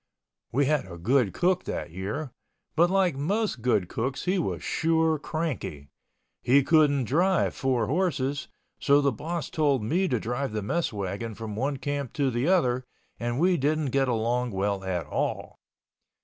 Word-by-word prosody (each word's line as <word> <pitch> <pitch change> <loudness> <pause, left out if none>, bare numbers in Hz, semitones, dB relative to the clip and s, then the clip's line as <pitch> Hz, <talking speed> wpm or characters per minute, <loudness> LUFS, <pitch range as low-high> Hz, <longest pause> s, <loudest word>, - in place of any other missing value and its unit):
We 140 +3 +2
had 140 -10 0
a 85 - -7
good 115 +4 +2
cook 180 +1 +1
that - - -4
year—but 130 - -3
like 185 -4 +2
most 190 - -1
good 105 -7 +2
cooks 125 +8 -3
he 185 +1 +1
was - - -2
sure 160 -1 +1
cranky. 135 - -4 0.5
He 135 +3 +4
couldn't 145 -3 +4
drive 175 - +2
four 130 -4 0
horses, 140 - -1 0.3
so 140 +1 +4
the 140 -1 +2
boss 165 +7 -4
told 145 -7 +2
me 175 - +1
to 125 -7 0
drive 120 +2 -3
the 105 -1 -2
mess 170 +11 -1
wagon 100 +2 -4
from 110 -1 -6
one 135 +5 -1
camp 145 -2 -3
to 140 -3 +1
the 120 +4 0
other, 130 -9 +2 0.4
and 120 0 -2
we 180 +1 +3
didn't 150 0 0
get 135 0 +2
along 120 +1 0
well 100 -1 -1
at 90 -3 -2
all. - - -3
135 Hz, 165 wpm, -27 LUFS, 115-160 Hz, 0.5 s, He